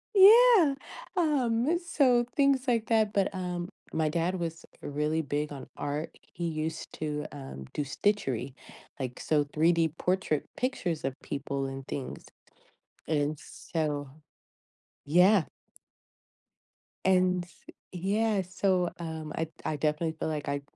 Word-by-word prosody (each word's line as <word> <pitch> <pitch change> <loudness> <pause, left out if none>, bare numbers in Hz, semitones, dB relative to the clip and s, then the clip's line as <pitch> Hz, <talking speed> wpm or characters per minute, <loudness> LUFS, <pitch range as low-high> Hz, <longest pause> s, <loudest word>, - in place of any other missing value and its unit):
Yeah, 410 - +8 0.4
um, 290 -2 +2
so 260 -8 +3
things, 275 -2 +3
like 230 -2 +1
that 220 -2 +2
but, 200 0 +1
um, 180 -1 -3 0.2
my 160 -1 +1
dad 175 +3 0
was 165 -1 -4 0.2
really 150 +2 -1
big 150 +1 -2
on 140 -2 -8
art, 145 +3 -3 0.2
he 175 - -4
used 160 0 -3
to, 150 -1 -2
um, 135 - -8
do 150 - -1
stitchery, 140 - -1 0.5
like, 125 -2 -4
so, 150 -2 +2
3D 165 +1 +3
portrait 180 -5 0
pictures 185 - -1
of 135 - -1
people 140 -1 -3
and 135 0 -6
things, 135 - -5 0.8
and 150 -1 0
so 150 -2 -3 1.0
yeah. 180 +3 +5 1.6
And 180 -1 +3 0.5
yeah, 200 +3 +1
so, 180 0 +1
um, 160 -2 -5
I 160 - 0
d 160 - -20
I 155 - 0
definitely 155 +2 0
feel - - -1
like 150 -1 -3
I 140 0 -1
165 Hz, 125 wpm, -29 LUFS, 150-205 Hz, 1.6 s, Yeah